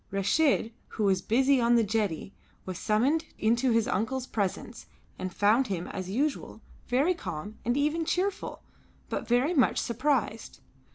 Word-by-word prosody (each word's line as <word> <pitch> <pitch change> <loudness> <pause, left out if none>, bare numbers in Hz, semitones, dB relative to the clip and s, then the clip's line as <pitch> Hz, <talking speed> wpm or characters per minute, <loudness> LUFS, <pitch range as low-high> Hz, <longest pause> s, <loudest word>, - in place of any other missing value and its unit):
Reshid, 225 +5 +2 0.2
who 220 - -4
was 190 -2 +2
busy 260 +5 +3
on 235 0 +4
the 230 - +4
jetty, 205 -4 -2 0.3
was 185 -1 -5
summoned 265 +10 +1
into 235 +4 +2
his 230 -2 +2
uncle's 245 +6 -1
presence 215 +1 -4 0.3
and 185 0 -3
found 220 +8 +3
him, 180 -4 -3
as 185 -1 -5
usual, 275 +1 -2 0.3
very 275 +9 +2
calm 205 - -7
and 240 +3 0
even 305 +3 +1
cheerful, 375 +4 -2 0.5
but - - -3
very 250 +8 +2
much 265 -8 +3
surprised. 235 -2 -1
235 Hz, 150 wpm, -28 LUFS, 205-270 Hz, 0.5 s, on